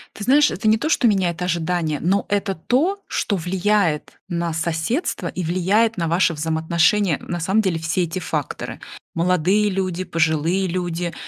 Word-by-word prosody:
Ты 205 - -6
знаешь, 290 +3 +5
это 210 +4 -2
не 220 - +5
то, 305 +8 -2
что 250 - +3
меняет 185 -4 +1
ожидания, 170 -3 -1
но 195 +4 +1
это 200 -1 0
то, 290 - 0
что 200 - -1
влияет 180 -2 0
на 170 -2 -2
соседство 170 - -2
и 185 - -4
влияет 195 +7 +2
на 170 -3 -1
ваше 170 +1 +2
взаимоотношение, 160 +3 +1
на 175 - -4
самом 190 +6 +2
деле 180 -5 -1
все 165 +3 0
эти 170 +2 -3
факторы: 155 -4 -4 0.3
молодые 180 +4 +2
люди, 185 -2 -2
пожилые 165 +3 +1
люди 175 -1 -3
180 Hz, 160 wpm, -21 LUFS, 165-200 Hz, 0.3 s, знаешь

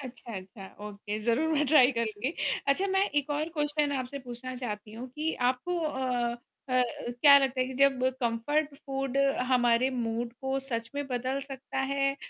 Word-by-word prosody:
अच्छा, 245 -3 -8
अच्छा। 190 +1 -9 0.2
ओके 205 +1 -5
ज़रूर 240 +9 +1
मैं 300 -1 +2
ट्राय 265 -3 +7
करूँगी। 230 +4 -2 0.3
अच्छा 325 +8 +3
मैं 385 0 +3
एक 290 0 0
और 300 +2 0
क्वेश्चन 295 -2 0
आपसे 255 +2 -4
पूछना 255 0 -7
चाहती 210 -4 -5
हूँ 240 +4 -7
कि 310 +4 -2 0.2
आपको 345 +8 -3
अ 255 -6 -1 0.3
अ, - - -4 0.5
क्या 285 -2 +9
लगता 265 -1 0
है 255 - +2
कि 260 - -6
जब 275 -1 +5 0.2
कम्फ़र्ट 280 +6 0
फ़ूड 270 -2 -4 0.3
हमारे 245 0 +3
मूड 235 -1 -2
को 265 0 -1
सच 230 -4 -3
में 285 0 -2
बदल 255 +1 -2
सकता 270 -1 -6
है? 275 +1 +1
260 Hz, 170 wpm, -29 LUFS, 240-285 Hz, 0.5 s, क्या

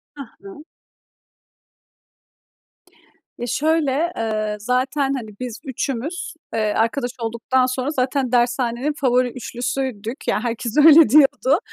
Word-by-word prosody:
Ha 280 - -7 0.2
ha. 200 +11 -12 2.7
Ya 240 - -5
şöyle, 310 +3 +1
eee, 215 -1 -2
zaten 265 +4 0
hani 235 -5 -5
biz 245 -3 -6
3'ümüz, 275 +7 -4 0.2
eee, 215 -2 0
arkadaş 240 +3 0
olduktan 235 +3 0
sonra 255 +1 -2
zaten 260 -2 -1
dershanenin 245 +3 0
favori 250 -1 +2
3'lüsüydük, 245 -1 -5
ya - - +1
herkes 235 +2 -3
öyle 315 +1 +8
diyordu. 285 +2 +4
255 Hz, 105 wpm, -21 LUFS, 235-280 Hz, 2.7 s, öyle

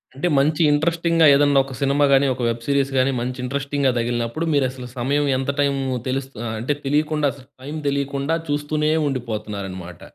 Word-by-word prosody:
అంటే, 160 +6 -1
మంచి 150 +4 +2
ఇంట్రెస్టింగ్‌గా 165 +2 +2
ఏదైనా 145 -1 +4
ఒక 135 -1 -8
సినిమా 140 +1 +3
గానీ, 135 +1 +5
ఒక 125 - -7
వెబ్ 115 0 -4
సీరీస్ 140 -1 +1
గానీ, 130 +1 +3
మంచి 125 +1 -3
ఇంట్రెస్టింగ్‌గా 140 +1 0
తగిలినప్పుడు 120 +6 -1
మీరు 140 -2 +3
అసలు 125 -1 -9
సమయం 140 +4 +1
ఎంత 135 +1 -3
టైము 140 -1 +1 0.3
తెలుస్త 135 +1 -3 0.3
అంటే 140 +5 -1
తెలియకుండా, 150 0 +1
అసలు 135 -2 -16 0.2
టైమ్ 150 +3 -5
తెలియకుండా 140 +2 -1
చూస్తూనే 150 +1 0 0.2
ఉండిపోతున్నారన్నమాట. 105 - -5
140 Hz, 160 wpm, -21 LUFS, 125-145 Hz, 0.3 s, గానీ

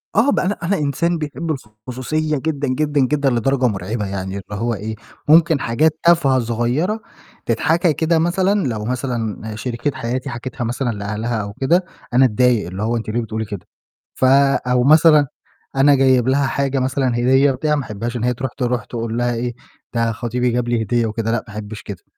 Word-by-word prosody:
آه 230 +7 +4
ب - - +1
أنا 195 +3 -1
أنا 195 +3 +1
إنسان 165 +4 0
بيحب 155 +2 -4 0.4
الخصوصية 150 +4 -1
جدًا، 145 -1 -2
جدًا، 145 +2 0
جدًا، 140 +1 +2
لدرجة 125 +1 +1
مرعبة 105 +1 -3
يعني 95 0 -4
اللي 105 +2 -7
هو 120 0 0
إيه، 110 +2 -5 0.3
ممكن 160 -1 +5
حاجات 155 +7 +1
تافهة 160 -6 +4
صغيّرة 120 - -1 0.5
تتحكى 160 +8 +2
كده 160 +1 +1
مثلًا، 190 +4 +1
لو 110 -3 -3
مثلًا 115 -4 -3
شريكة 120 +4 -2
حياتي 125 +1 -3
حكِتها 120 0 -5
مثلًا 120 +2 -2
لأهلها 105 +2 -3
أو 100 0 -6
كده، 170 - +1 0.3
أنا 130 +2 +6
أتضايق 125 -3 +2
اللي 95 +4 -5
هو 115 +1 0
أنتِ 110 - -5
ليه 120 +2 0
بتقولي 110 0 -4
كده، 100 -4 -7 0.5
ف - - +1
أو 130 -2 +3
مثلًا 150 0 +6 0.5
أنا 140 +1 +5
جايب 130 -2 +3
لها 135 +1 +2
حاجة 135 0 0
مثلًا، 130 0 0
هدية، 130 +3 +4
بتاع، 150 +4 0
ما 145 - -2
أحبهاش 115 +2 -5
إن 115 - -4
هي 125 0 +2
ترُوح 130 +1 -4
ترُوح 125 -4 -1
تقول 115 -1 -4
لها 120 0 +1
إيه، 120 +1 -2 0.4
ده 115 0 +1
خطيبي 120 +2 -1
جاب 120 0 -1
لي 115 -2 +1
هدية 120 +2 +1
وكده، 115 +1 -2
لأ 115 - +2
ما 105 - -11
أحبش 105 0 -7
كده. 95 -4 -8
125 Hz, 185 wpm, -19 LUFS, 115-145 Hz, 0.5 s, أنا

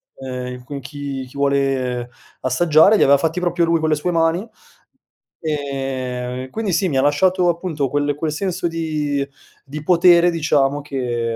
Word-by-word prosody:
uhm, 125 -1 -6
con 140 +2 -7
chi 140 -1 -6
chi 130 - -13
vuole 135 -3 0 0.3
assaggiare;" 160 - +4
li - - +4
aveva 140 +1 +6
fatti 160 +3 -1
proprio 175 -1 +1
lui 165 0 +2
con 160 0 0
le - - +3
sue 150 +4 -2
mani, 165 +5 +1 0.9
ehm, 130 -4 -3
quindi 220 -4 -2
sì, 190 +1 +1
mi 145 - -3
lasciato 175 +6 +3
appunto 165 -5 -1
quel 145 +1 0
quel 155 0 -2
senso 185 +2 -2
di 155 -4 -2 0.4
di 150 +2 -7
potere 175 +1 +5
diciamo 145 -3 +1
che 120 -5 -3
145 Hz, 155 wpm, -20 LUFS, 135-170 Hz, 0.9 s, aveva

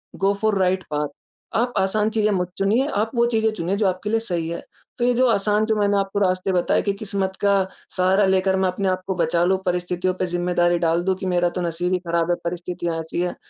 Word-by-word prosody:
गो 195 +1 +2
four 215 -2 +2
right 185 0 +1
path. 150 0 0 0.5
आप 245 +2 +1
आसान 210 +3 +1
चीज़ें 215 -1 +1
मत 180 -2 -1
चुनिए, 220 +8 +2
आप 220 -4 -1
वो 235 - +4
चीज़ें 220 -1 +2
चुनिए 185 -1 -2
जो 205 -2 +2
आपके 185 +3 -2
लिए 225 +1 +2
सही 175 -7 -3
है। 170 - -5 0.3
तो 240 - +1
ये 245 - +3
जो 255 +1 +3
आसान 210 0 +2
जो 220 - +1
मैंने 205 -1 +2
आपको 195 +1 -1
रास्ते 185 0 +1
बताए 180 -1 +2
कि 200 - 0
किस्मत 195 -2 -3
का 200 0 +4 0.4
सहारा 190 +2 +3
लेकर 190 0 +2
मैं 190 0 +2
अपने 190 +1 -2
आप 185 0 -1
को 190 - -1
बचा 170 0 +1
लूँ 190 +1 +3
परिस्थितियों 180 +1 -1
पर 185 - -2
ज़िम्मेदारी 175 0 +1
डाल 170 +1 +1
दूँ 190 -1 +2
कि 190 - -6
मेरा 175 -1 +2
तो - - -1
नसीब 175 +2 -1
ही 180 - +1
ख़राब 170 0 0
है - - +3
परिस्थितियाँ 175 -1 -3
ऐसी 160 +2 -3
है। 180 - -2
190 Hz, 235 wpm, -22 LUFS, 175-205 Hz, 0.5 s, वो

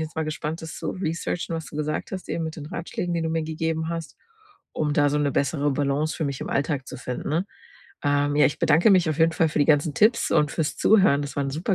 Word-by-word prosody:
jetzt 160 0 -5
mal 160 - 0
gespannt, 155 +1 -4
das 160 - -7
zu - - -3
researchen, 170 -1 -3
was 160 -1 -4
du 150 - -9
gesagt 150 0 -2
hast, 185 - -6
eben 165 - -2
mit 160 - -5
den 150 -1 -7
Ratschlägen, 170 +1 -4
den 165 -1 -1
du - - 0
mir 165 0 0
gegeben 160 0 -2
hast, 165 -1 -5 0.6
um 150 -1 -1
da 145 -1 +3
so 150 - +1
'ne 145 -2 +1
bessere 145 0 +1
Balance 145 +2 0
für 160 - -2
mich 140 -2 -3
im - - -5
Alltag 140 -1 -1
zu 130 - -7
finden, 125 +2 -5
ne? 165 +6 0 0.6
Ähm, 145 0 +2
ja, 150 - +6
ich - - -3
bedanke 165 +8 +4
mich 180 -4 +4
auf 155 - -3
jeden 165 0 +4
Fall 160 0 +2
für 150 - -2
die - - +5
ganzen 150 0 +3
Tipps 225 +3 +3
und 150 0 +2
fürs 160 -3 -1
Zuhören. 190 -10 +4
Das 145 - -7
war 140 - +1
'n 135 - -2
super 165 +8 -1
155 Hz, 260 wpm, -24 LUFS, 145-165 Hz, 0.6 s, ja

